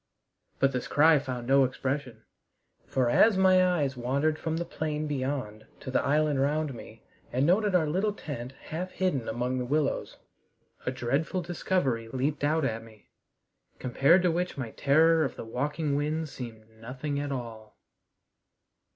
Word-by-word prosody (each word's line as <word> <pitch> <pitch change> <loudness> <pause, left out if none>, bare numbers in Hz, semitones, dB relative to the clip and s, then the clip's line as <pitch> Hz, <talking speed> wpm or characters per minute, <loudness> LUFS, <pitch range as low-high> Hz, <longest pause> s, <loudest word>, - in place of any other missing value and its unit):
But 135 - +3
this 125 -2 -3
cry 155 +1 +5
found 130 -3 -5
no 135 +2 +5
expression, 130 0 -3 0.6
for 130 -2 +1
as 200 - +5
my 185 -1 +5
eyes 155 -7 +1
wandered 140 +6 0
from 160 0 -2
the 170 - -2
plain 155 -2 -3
beyond 130 -7 -3
to 130 - -6
the 130 - +2
island 145 -1 +2
round 150 +1 0
me 115 -1 -12 0.3
and 130 +3 +1
noted 195 +3 +3
our 170 -3 +4
little 190 +8 0
tent 135 - -7
half 175 +4 -5
hidden 180 -11 -1
among 125 +3 -1
the - - -1
willows, 145 +2 -1 0.7
a - - +2
dreadful 140 +9 -1
discovery 160 -9 -1
leaped 135 +5 -2
out 155 +1 +2
at 115 -3 -2
me, 110 -2 -18 0.7
compared 140 +8 +3
to 180 - +3
which 180 0 -2
my 125 -5 -4
terror 160 +3 +4
of 135 - -3
the - - -7
walking 145 +5 -2
winds 150 +1 -1
seemed 115 -3 -8
as 110 - -28
nothing 135 +5 -4
at 145 0 -3
all. 115 -4 -7
140 Hz, 160 wpm, -28 LUFS, 125-160 Hz, 0.7 s, cry